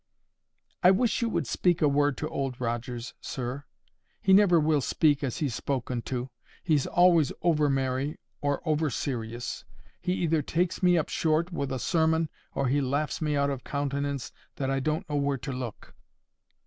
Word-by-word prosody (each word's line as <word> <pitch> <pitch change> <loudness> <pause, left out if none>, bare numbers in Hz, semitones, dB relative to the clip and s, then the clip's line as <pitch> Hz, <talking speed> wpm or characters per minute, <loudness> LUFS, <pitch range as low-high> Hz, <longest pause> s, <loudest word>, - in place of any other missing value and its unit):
"I 180 - +7
wish 225 +5 +2
you 235 - +1
would 170 -7 -1
speak 175 +7 +1
a 150 - +4
word 145 -1 +2
to 155 - -2
Old 135 -5 -3
Rogers, 120 0 -3
sir. 130 +2 -5 0.5
He 190 - +3
never 190 -4 +6
will 155 -1 +2
speak 145 +2 +2
as 130 -4 -2
he's 145 -6 -1
spoken 125 -1 -2
to. 125 0 -3 0.3
He's 155 -6 +2
always 175 -5 +4
over 150 -4 +3
merry, 135 +1 -1 0.2
or 145 -1 -1
over 155 0 +2
serious. 120 -2 -4 0.4
He 180 - 0
either 165 -4 +1
takes 170 +5 -1
me 180 -1 +5
up 160 - 0
short 165 +2 +1
with 140 -4 -2
a 130 - -1
sermon, 160 +1 +1 0.3
or 140 - +1
he 140 +3 +2
laughs 140 +5 -1
me 150 -1 0
out 140 0 +2
of 135 -2 -5
countenance 140 -1 -2 0.2
that 135 -1 -2
I 135 - +1
don't 155 +7 -1
know 150 -2 -1
where 140 -1 +1
to 125 +3 -5
look." 125 -4 -6
145 Hz, 175 wpm, -28 LUFS, 130-160 Hz, 0.5 s, I